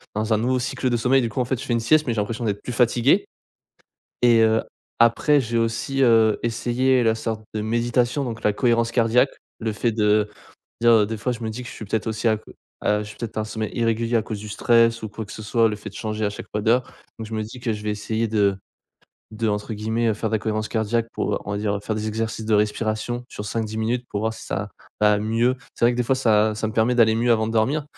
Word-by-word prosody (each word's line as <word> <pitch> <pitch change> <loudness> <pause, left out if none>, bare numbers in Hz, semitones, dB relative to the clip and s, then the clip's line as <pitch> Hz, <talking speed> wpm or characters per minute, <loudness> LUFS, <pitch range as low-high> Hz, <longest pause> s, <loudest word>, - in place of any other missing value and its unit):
dans 110 +1 0
un - - +3
nouveau 130 +2 +1
cycle 125 +1 -1
de 120 - +1
sommeil. 130 +3 +3
Du 115 - -1
coup 110 - -4
en 125 - +1
fait 130 -1 -2
je - - -6
fais 120 - -1
une 115 - +2
sieste 150 +6 +3
mais 120 - +1
j'ai 110 - -1
l'impression 110 +3 -3
d'être 105 -1 -2
plus 125 - -5
fatigué 125 - +3 1.0
et, 120 -2 +6
heu. 110 0 +3 0.4
Après 140 +6 +4
j'ai 115 -1 -1
aussi, 115 +4 0
heu, 115 -3 +4
essayé 125 +2 +1
la 110 -1 +3
sorte 110 -1 -4
de 105 - -1
méditation, 120 +4 0
donc 115 -2 -5
la 105 -1 +2
cohérence 115 -1 +2
cardiaque, 120 +2 +3 0.3
le 110 -1 -1
fait 115 +2 0
de 105 -1 +2 0.5
dire, 115 -3 +5
des 110 - -4
fois 125 +4 -2
je 120 - -7
me 110 - -3
dis 125 +3 -6
que 120 - -9
je - - -9
suis 110 - -8
peut-être 110 +2 -2
aussi 110 +1 0
à 110 - +3
que 105 - -14 0.3
à 105 0 +1
je 105 - -8
suis 105 - -11
peut-être 110 -2 -5
un 110 - 0
sommeil 110 0 -4
irrégulier 115 0 +1
à 115 - +2
cause 110 -1 -5
du 105 +1 -8
stress 115 +1 +3
ou 110 - -4
quoi 110 +2 -6
que 105 - -11
ce 110 - -8
soit, 115 +2 +2
le 105 - -3
fait 105 +1 -8
de 100 - -13
changer 110 0 -3
à - - -1
chaque - - -8
fois 105 - -1
d'heures. 120 +4 +3 0.4
Donc 110 - -6
je 110 - -6
me 110 - -1
dis 110 +4 -8
que 120 -2 -2
je 105 -1 -6
vais 105 - -2
essayer 110 +2 -2
de 100 -3 +2 0.7
de 110 +1 -3
entre 105 +2 -2
guillemets, 110 +2 -1
heu, 110 - +1
faire 110 +1 -3
de - - 0
la - - +2
cohérence 110 0 -2
cardiaque 115 +1 0
pour, - - -1
heu, - - -1
on - - -6
va 100 - -2
dire, 105 -1 -1
heu, - - -6
faire 110 - -2
des 110 0 -3
exercices 110 0 -3
de 110 - +2
respiration 110 +3 -1
sur 105 - -7
5-10 110 +1 -3
minutes 120 +3 -1
pour 100 - -3
voir 110 +1 0
si - - -11
ça 100 +1 -3 0.3
va 105 -1 +5
mieux. 115 +4 +1 0.2
C'est - - 0
vrai 120 - +5
que - - -4
des - - +3
fois 130 +3 +1
ça 110 -3 +3
ça 110 - -2
me - - -6
permet 115 +2 +2
d'aller 110 -2 +4
mieux 120 +1 +1
avant 110 -1 +1
de 115 - -3
dormir, 135 +7 +1
110 Hz, 270 wpm, -23 LUFS, 110-120 Hz, 1.0 s, et